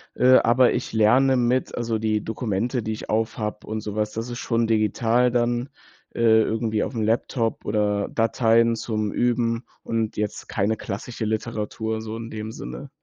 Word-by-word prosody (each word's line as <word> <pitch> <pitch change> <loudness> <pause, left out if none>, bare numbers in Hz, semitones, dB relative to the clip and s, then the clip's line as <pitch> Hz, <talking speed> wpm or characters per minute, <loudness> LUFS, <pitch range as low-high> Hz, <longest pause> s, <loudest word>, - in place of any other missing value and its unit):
äh, 130 +1 +6
aber 120 +2 +4
ich - - -3
lerne 125 +5 +4
mit 125 +1 +1
also 115 -2 -1
die 110 -1 0
Dokumente, 115 +2 -2
die 110 - -3
ich 110 - -6
auf 110 +1 0
habe 105 -1 -4
und 110 0 -3
sowas, 105 0 -2
das 115 +3 -5
ist 120 0 -5
schon 115 -1 0
digital 115 +3 +2
dann, 120 +1 0 0.4
äh, - - -7 0.2
irgendwie 110 -1 0
aufm 115 -4 -3
Laptop 115 +1 0
oder 105 -1 0
Dateien 115 0 +3
zum 110 -2 -2
Üben 120 -1 0 0.2
und 115 -1 -2
jetzt 105 -1 -3
keine 105 +2 0
klassische 110 +3 -5
Literatur 110 0 -3
so 110 0 -6
in 115 0 -7
dem 110 0 -6
Sinne. 140 +4 -8
115 Hz, 165 wpm, -24 LUFS, 110-120 Hz, 0.4 s, äh